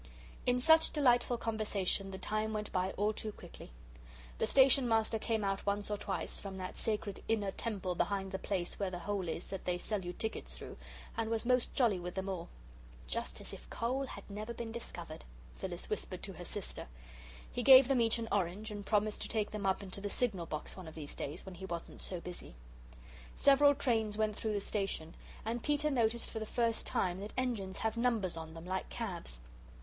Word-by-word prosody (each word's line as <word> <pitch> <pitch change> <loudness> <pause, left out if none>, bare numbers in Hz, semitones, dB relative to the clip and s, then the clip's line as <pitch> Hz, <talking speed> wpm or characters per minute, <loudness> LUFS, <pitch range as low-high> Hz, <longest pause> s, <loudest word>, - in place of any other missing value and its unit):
In 250 0 +4
such 320 +5 +7
delightful 245 -4 +4
conversation 210 -4 0
the 190 - -5
time 215 +3 -1
went 210 -1 -3
by 185 0 +1
all 210 +2 +1
too 215 0 -3
quickly. - - -11 0.7
The - - +2
Station 265 -1 +6
Master 225 0 +3
came 220 -1 0
out 195 0 0
once 205 +1 0
or 210 - +1
twice 200 -1 -3
from 195 -1 -6
that 185 -1 -5
sacred 210 -2 -2
inner 210 -3 +1
temple 195 -4 -2
behind 195 +1 0
the 190 - -2
place 185 -4 -2
where 200 -2 +1
the 180 - -4
hole 190 0 -2
is 165 - -3
that 195 - -5
they 180 -1 +1
sell 200 +2 -1
you 175 - -3
tickets 220 +4 -3
through, - - -8 0.4
and 225 -1 -1
was 225 0 0
most 250 0 +3
jolly 225 -8 +4
with 175 0 -5
them 190 0 -2
all. 175 -3 -4 0.6
"Just - - -3
as - - -6
if - - -10
coal 260 +4 -1
had - - -9
never 215 +3 -5
been 230 -1 -4
discovered," 175 -8 -6 0.3
Phyllis - - -4
whispered - - -3
to - - -4
her - - -8
sister. - - -4 0.6
He 245 - -1
gave 260 +1 +10
them 265 -3 +4
each 230 0 +3
an 230 -1 -3
orange, 200 +2 0
and 205 -1 -5
promised 210 0 +1
to - - 0
take 215 -2 0
them 210 -2 -2
up 190 +1 +1
into 195 0 -5
the 205 - -2
signal 195 -8 0
box 155 0 -4
one 185 -3 -8
of 160 - -9
these 150 -3 -6
days, 150 +5 -5
when 190 - -7
he 185 +2 -7
wasn't 170 -2 -5
so 180 - -3
busy. 175 - -8 0.8
Several 285 +1 +6
trains 220 -6 +1
went 215 -1 +1
through 220 0 -1
the 205 - 0
station, 195 -6 -2 0.3
and 230 +2 -1
Peter 295 +2 +2
noticed 235 -3 +2
for 220 - -3
the 220 - -4
first 230 -1 +1
time 180 -1 +1
that 205 +2 -6
engines 220 -7 -1
have 220 0 0
numbers 230 -7 +1
on 160 0 -7
them, 165 +1 -8
like 185 +1 -2
cabs. 175 - -4
210 Hz, 205 wpm, -34 LUFS, 185-230 Hz, 0.8 s, gave